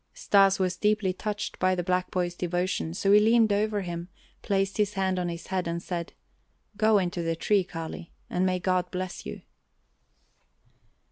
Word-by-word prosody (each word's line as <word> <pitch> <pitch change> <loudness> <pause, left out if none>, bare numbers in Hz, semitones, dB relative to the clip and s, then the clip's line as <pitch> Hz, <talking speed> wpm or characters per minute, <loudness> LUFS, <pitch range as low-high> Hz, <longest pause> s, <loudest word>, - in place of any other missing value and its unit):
Stas 195 -1 +4
was 185 -1 0
deeply 210 -3 +1
touched 210 +2 -4
by 185 0 +3
the 175 - -2
black 180 +1 0
boy's 175 -1 -1
devotion, 175 -1 -2
so 195 +1 +1
he 205 - +8
leaned 220 0 +4
over 210 0 0
him, 175 -1 -5 0.3
placed 195 0 0
his 210 -1 +1
hand 190 -1 0
on 175 -1 -1
his 170 0 -6
head, 185 -2 -2
and 170 0 -2
said: 170 -1 -5 0.6
"Go 215 +1 +4
into 180 -2 -1
the 165 0 -1
tree, 200 +3 +2
Kali 165 -1 -7 0.2
and 180 - -1
may 185 -1 +2
God 180 0 0
bless 185 0 -5
you!" - - -7
185 Hz, 175 wpm, -27 LUFS, 175-200 Hz, 0.6 s, he